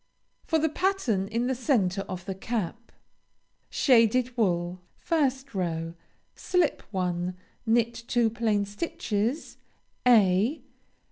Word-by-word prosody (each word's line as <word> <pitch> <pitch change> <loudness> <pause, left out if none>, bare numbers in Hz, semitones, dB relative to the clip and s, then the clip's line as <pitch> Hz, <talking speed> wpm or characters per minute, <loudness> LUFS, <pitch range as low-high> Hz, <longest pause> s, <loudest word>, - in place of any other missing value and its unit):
FOR 320 - +2
THE 320 0 +2
PATTERN 305 - 0
IN 230 +3 -1
THE 260 - +1
CENTRE 220 - +1
OF 180 -1 -6
THE 195 - -3
CAP. 225 +2 -4 0.8
SHADED 250 -1 +3
WOOL 180 -5 0 0.3
1st 270 -5 0
row 165 -3 -2 0.4
Slip 360 -4 0
one. 180 -2 -2 0.3
Knit 235 +1 +3
two 235 -2 +2
plain 215 -3 0
stitches 240 - -3 0.5
(_a. 220 - +4
225 Hz, 110 wpm, -27 LUFS, 190-260 Hz, 0.8 s, a